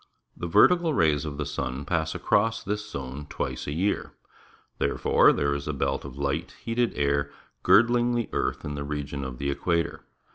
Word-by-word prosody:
The 85 - -5
vertical 170 - +4
rays 75 - +2
of 75 -2 -5
the 75 - -2
sun 70 -2 -4
pass 80 0 -1
across 115 +2 +1
this 105 0 -3
zone 70 -2 -6
twice - - -4
a - - -2
year. 95 +7 -1 0.7
Therefore 70 - +4
there 70 0 +1
is 70 0 -4
a 75 - -1
belt 70 - -1
of 70 -1 -9
light, 70 -1 -2
heated 120 0 0
air 70 0 0 0.3
girdling 120 +1 +4
the 120 -1 -1
earth - - -1
in 75 - -4
the 70 0 -4
region 70 -1 -4
of 65 -2 -6
the 70 +2 -1
equator. 85 +4 -1
75 Hz, 180 wpm, -26 LUFS, 70-105 Hz, 0.7 s, vertical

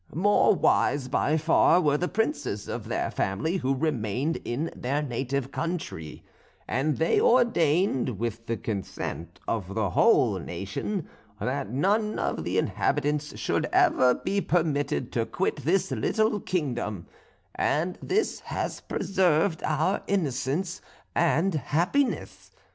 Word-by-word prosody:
"More 205 +3 +4
wise 140 -6 +2
by 150 +4 +1
far 165 +2 +4
were 150 -5 +2
the 175 +4 0
princes 215 - -2
of - - -5
their - - -1
family, 130 - -1
who 135 -4 0
remained 135 0 -1
in 140 +8 -2
their 140 +4 -1
native 135 0 -2
country; 160 - -4 0.4
and 140 +2 0
they 160 - +2
ordained, 170 - +3
with 115 +1 -4
the 115 - -1
consent 95 -4 -5
of 100 -3 -2
the 105 -4 0
whole - - +4
nation, 150 - -4 0.3
that 130 -5 -2
none 205 - +1
of - - -2
the - - -1
inhabitants 150 0 0
should - - 0
ever 125 -1 +4
be 200 0 -1
permitted 145 - 0
to - - 0
quit - - -1
this 175 +1 0
little 215 - +1
kingdom; 120 - -2 0.5
and 175 +4 0
this 425 +3 0
has - - -4
preserved 180 -2 +1
our 160 +6 +1
innocence 170 0 -1 0.3
and 170 +2 +2
happiness. 175 - -1
150 Hz, 125 wpm, -27 LUFS, 125-180 Hz, 0.5 s, More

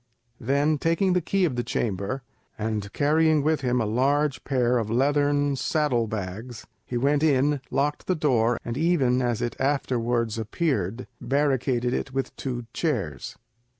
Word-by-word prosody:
Then, 140 +4 +1
taking 175 +4 +2
the 180 - +2
key 190 +3 +1
of 145 -7 -1
the 120 - 0
chamber, 105 +5 -2 0.3
and 105 -2 -3
carrying 155 +1 +3
with 155 0 +1
him 125 -1 +1
a 110 - +1
large 135 +4 +1
pair 125 -3 +1
of 110 -2 -3
leathern 145 +3 +2
saddle 130 -5 0
bags, 110 +3 -6 0.2
he 125 - -2
went 140 +4 +2
in, 145 -2 +2
locked 145 +2 -1
the 185 - +2
door, 120 -7 +2
and 120 +3 -3
even, 140 -7 +2
as 120 -3 0
it 120 - -2
afterwards 120 -5 0
appeared, 115 - -1 0.2
barricaded 130 -3 +1
it 135 - -2
with 135 - -2
two 125 -3 -4
chairs. 100 - -2
130 Hz, 150 wpm, -25 LUFS, 120-145 Hz, 0.3 s, carrying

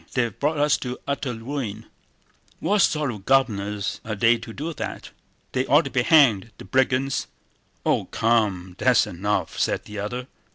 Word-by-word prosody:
They've 120 -5 -1
brought 150 +2 0
us 145 0 +3
to 125 -1 -5
utter 140 -2 -2
ruin! 120 -2 -5 0.7
What 205 +1 +1
sort 150 -6 +2
of 105 -4 -9
governors 105 -6 +1
are 110 -1 -4
they 115 +3 +3
to 115 0 -9
do 155 +8 -5
that? - - -6 0.4
They 130 - 0
ought 145 +4 +5
to - - -6
be 130 - +2
hanged—the 115 - +3
brigands!..." 130 +4 +1 0.6
"Oh - - +2
come, 105 -6 0
that's 125 -3 +4
enough!" 100 +1 -2
said - - 0
the 105 0 -7
other. 125 +5 -4
125 Hz, 160 wpm, -24 LUFS, 105-135 Hz, 0.7 s, ought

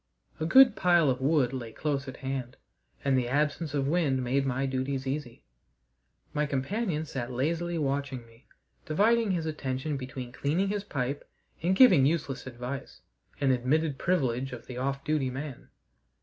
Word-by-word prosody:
A 160 - -1
good 265 +7 +7
pile 175 -6 +4
of 125 0 -3
wood 135 -3 +2
lay 120 -4 -5
close 140 +2 -2
at 130 - -7
hand, 130 -2 -4 0.5
and 135 -1 +3
the 125 -2 +1
absence 150 +3 0
of 135 -1 0
wind 145 -5 +1
made 135 +2 +1
my 130 +1 0
duties 135 0 -2
easy. 135 - -4 0.9
My 150 0 0
companion 155 - -1
sat 130 -4 -5
lazily 165 +7 -1
watching 140 -4 -2
me, 115 +1 -22 0.4
dividing 220 +7 +3
his 175 -4 0
attentions 140 -1 -3
between 130 -1 -6
cleaning 160 +9 0
his 205 -1 -2
pipe 140 -6 -3 0.3
and 180 +4 +2
giving 190 - +7
useless 145 -5 -2
advice 125 +2 -6 0.4
an 140 -2 +3
admitted 135 +4 +1
privilege 135 -7 0
of 125 - -8
the 125 - -8
off 140 +1 -2
duty 150 -3 0
man. 135 +1 -7
140 Hz, 160 wpm, -29 LUFS, 130-155 Hz, 0.9 s, good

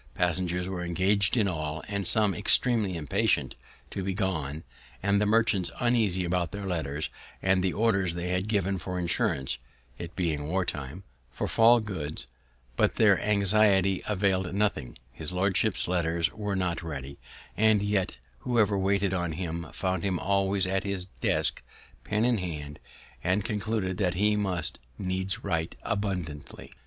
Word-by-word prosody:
Passengers 90 0 0
were 90 -2 -4
engaged 95 +6 +2
in 105 -3 +3
all, 75 -3 -3
and 100 -3 -2
some 105 -3 +3
extremely 105 -1 +2
impatient 75 -3 +1 0.4
to - - -3
be 95 0 -2
gone, 80 -7 -2 0.4
and 100 +1 +3
the 105 - +2
merchants 105 -4 +3
uneasy 110 -7 +2
about 85 0 0
their 100 +1 -5
letters, 80 -5 -2 0.3
and 95 -1 +3
the 95 - +1
orders 95 -6 +1
they 85 +1 -3
had 90 +2 -1
given 100 -3 0
for 90 0 -4
insurance 70 -7 0 0.4
(it 85 0 -7
being 80 -5 -1
war 90 +3 0
time) 75 +4 -5 0.3
for - - -3
fall 115 +2 +6
goods; 80 -10 -5 0.5
but - - +2
their - - +4
anxiety 100 -2 +3
avail'd 95 -3 0
nothing; 100 -11 -1
his 75 +4 -4
lordship's 95 +3 +1
letters 85 -2 0
were 105 -2 -3
not 90 -2 -1
ready; 70 -4 -7 0.4
and 110 -1 +4
yet 100 -6 0 0.2
whoever 110 -5 +2
waited 100 0 +1
on 85 -3 -1
him 85 0 -4
found 95 -2 -1
him 95 -1 0
always 100 +1 +1
at 95 +1 0
his 100 -2 -1
desk, 95 - 0 0.4
pen 105 +2 0
in 120 -3 +2
hand, 75 -5 -6 0.4
and 95 +3 +1
concluded 105 -2 -2 0.2
he 105 +3 +3
must 95 -6 0 0.2
needs 95 0 -2
write 80 -4 -1
abundantly. 90 -8 -4
95 Hz, 150 wpm, -28 LUFS, 85-100 Hz, 0.5 s, fall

